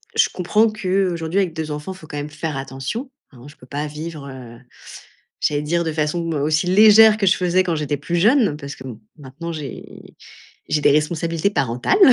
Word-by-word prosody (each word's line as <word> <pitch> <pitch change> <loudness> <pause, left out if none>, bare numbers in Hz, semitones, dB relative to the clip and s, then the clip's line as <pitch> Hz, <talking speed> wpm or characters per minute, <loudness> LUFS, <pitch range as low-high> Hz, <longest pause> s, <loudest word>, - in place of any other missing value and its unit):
je - - +4
comprends 210 +5 +2
qu'aujourd'hui 185 -4 -1
avec 180 -4 -2
2 160 -1 -4
enfants, 150 +5 -5
il - - -14
faut 155 - -14
quand 145 - -7
même 145 +1 -4
faire 150 -1 -4
attention, 135 - -5 0.2
hein, 125 -1 -15
je 150 - -16
peux 125 - -17
pas 145 +3 -3
vivre, 150 -1 -7
heu 125 -3 -10 0.8
j'allais 145 0 0
dire 170 +3 0
de 160 - -2
façon 160 +2 -1
aussi 155 +3 0
légère 215 +2 +7
que 200 - +1
je 185 - +4
faisais 180 0 +2
quand 175 -2 0
j'étais 150 -1 -2
plus 170 +4 -3
jeune, 215 - +3
parce 140 -1 -8
que 130 - -12
bon, 120 -5 -8 0.2
maintenant 145 +5 -8
j'ai 150 -4 -9 0.5
j'ai 150 - +1
des - - +5
responsabilités 165 +4 0
parentales. 125 - 0
160 Hz, 200 wpm, -20 LUFS, 145-185 Hz, 0.8 s, légère